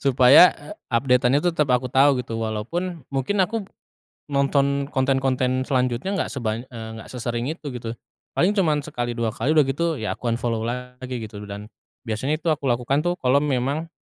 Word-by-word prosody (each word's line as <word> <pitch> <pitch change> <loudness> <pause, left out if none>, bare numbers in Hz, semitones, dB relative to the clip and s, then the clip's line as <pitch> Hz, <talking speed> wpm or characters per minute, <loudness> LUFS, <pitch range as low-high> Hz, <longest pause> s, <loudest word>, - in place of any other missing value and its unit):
supaya 130 +1 +7
e 145 - -14 0.2
update-an 125 +2 +3
itu 175 +4 +1
tetap 150 -4 +1
aku 125 0 +2
tahu 135 -2 +4
gitu, 115 -1 -4
walaupun 140 +10 -3
mungkin 135 +10 -1
aku 225 +4 -3 0.7
nonton 140 0 +1
konten-konten 130 -1 +1
selanjutnya 130 +6 0
enggak 195 - -1
sebanya 120 -1 -3
eee, 115 -2 -8
enggak - - -13
sesering 120 +1 -3
itu 150 -4 -6
gitu. 115 -1 -6 0.4
Paling 185 +4 +3
cuma 170 -7 +2
sekali 120 0 -4
2 115 -2 -1
kali, 135 - -2
udah 150 - +6
gitu 160 +3 -1
ya 110 - -2
aku 120 - -4
unfollow 115 -1 -1
lagi 125 +2 -5
gitu 105 -3 -7
loh. 105 - -10
Dan 100 +1 -6 0.4
biasanya 130 +7 -1
itu 160 0 +1
aku 140 -3 -2
lakukan 125 +4 +1
tuh 175 +2 -1
kalau 135 -1 +3
memang, 145 +3 -1
130 Hz, 180 wpm, -23 LUFS, 120-145 Hz, 0.7 s, supaya